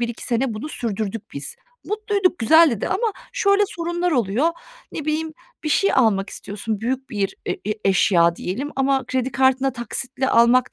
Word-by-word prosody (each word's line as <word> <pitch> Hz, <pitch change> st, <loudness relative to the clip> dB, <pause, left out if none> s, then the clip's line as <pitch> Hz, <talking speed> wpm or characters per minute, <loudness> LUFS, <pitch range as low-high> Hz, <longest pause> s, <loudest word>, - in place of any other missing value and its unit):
1-2 235 Hz, -1 st, -3 dB
sene 240 Hz, -1 st, 0 dB
bunu 220 Hz, +9 st, -5 dB
sürdürdük, 220 Hz, -4 st, -4 dB
biz. 140 Hz, 0 st, -6 dB, 0.3 s
Mutluyduk, 410 Hz, -3 st, 0 dB
güzeldi 300 Hz, -2 st, +5 dB
de -, -, -1 dB
ama 435 Hz, +2 st, 0 dB, 0.2 s
şöyle 400 Hz, 0 st, +3 dB
sorunlar 345 Hz, -2 st, -2 dB
oluyor. 245 Hz, -, +2 dB, 0.4 s
Ne 310 Hz, -, -5 dB
bileyim, 310 Hz, +1 st, -1 dB, 0.3 s
bir 305 Hz, -, 0 dB
şey 395 Hz, +6 st, +3 dB
almak 205 Hz, -6 st, +2 dB
istiyorsun, 210 Hz, +1 st, -5 dB
büyük 260 Hz, +4 st, -3 dB
bir 200 Hz, -4 st, -2 dB
e -, -, 0 dB
e -, -, -7 dB, 0.3 s
eşya 175 Hz, -3 st, +4 dB
diyelim 255 Hz, +11 st, -4 dB
ama 270 Hz, -1 st, +1 dB
kredi 260 Hz, 0 st, -1 dB
kartına 265 Hz, +1 st, +3 dB
taksitle 255 Hz, +2 st, -3 dB
almak 240 Hz, +1 st, +4 dB
260 Hz, 160 wpm, -22 LUFS, 220-310 Hz, 0.4 s, güzeldi